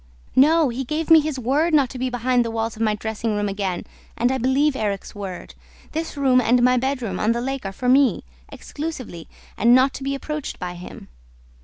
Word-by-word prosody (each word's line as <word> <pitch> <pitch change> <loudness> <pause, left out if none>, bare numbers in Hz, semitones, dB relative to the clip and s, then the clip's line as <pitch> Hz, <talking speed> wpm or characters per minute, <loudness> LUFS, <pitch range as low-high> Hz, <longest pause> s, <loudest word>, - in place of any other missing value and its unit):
"No. 305 +2 +5
He 250 +3 -3
gave 310 +5 -3
me 325 - +9
his 305 -2 -2
word 290 +7 +1
not 275 -5 +3
to 255 - -7
be 255 +1 -1
behind 245 0 +1
the 230 - -4
walls 225 0 -3
of 220 - -8
my 215 -1 +2
dressing 220 +1 -3
room 205 0 -1
again 195 -3 -3 0.3
and 245 +2 +2
I 265 - -1
believe 265 +4 +2
Erik's 205 -5 -3
word. 195 -4 -7 0.4
This 320 -1 -4
room 260 -3 +4
and 245 +1 +3
my 250 0 +4
bedroom 250 -6 -2
on 220 +2 +2
the 235 - -2
lake 265 -4 -3
are - - -5
for 250 +6 -5
me, 260 -4 +4 0.3
exclusively, 265 - -7 0.3
and 235 +3 +5
not 260 +1 +4
to 275 - -7
be 275 +1 -1
approached 300 +1 -5
by 180 -1 -5
him." 180 0 -11
250 Hz, 210 wpm, -22 LUFS, 220-275 Hz, 0.4 s, me